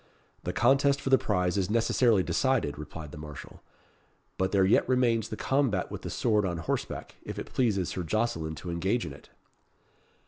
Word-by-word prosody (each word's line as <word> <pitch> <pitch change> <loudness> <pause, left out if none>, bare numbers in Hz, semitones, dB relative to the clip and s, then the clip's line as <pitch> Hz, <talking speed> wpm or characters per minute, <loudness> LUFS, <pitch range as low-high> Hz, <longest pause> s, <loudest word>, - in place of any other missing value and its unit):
"The - - -1
contest 140 +1 +3
for 135 - -3
the 130 - +6
prize 90 -2 0
is 95 -1 -1
necessarily 115 -2 +3
decided," 130 - +1
replied 75 0 -8
the 75 - -9
marshal; 75 -1 -10 0.7
"but 95 0 0
there 95 -2 +4
yet 100 - +3
remains 120 -3 +2
the 110 - -5
combat 135 -9 0
with - - -6
the - - -5
sword 105 -3 +1
on 90 -3 -1
horseback, 80 - -4
if - - -7
it - - -7
pleases 105 -8 +1
Sir 90 - -3
Jocelyn 85 -4 -1
to 85 +2 -6
engage 95 +6 0
in 75 - -6
it." - - -15
100 Hz, 180 wpm, -28 LUFS, 85-120 Hz, 0.7 s, the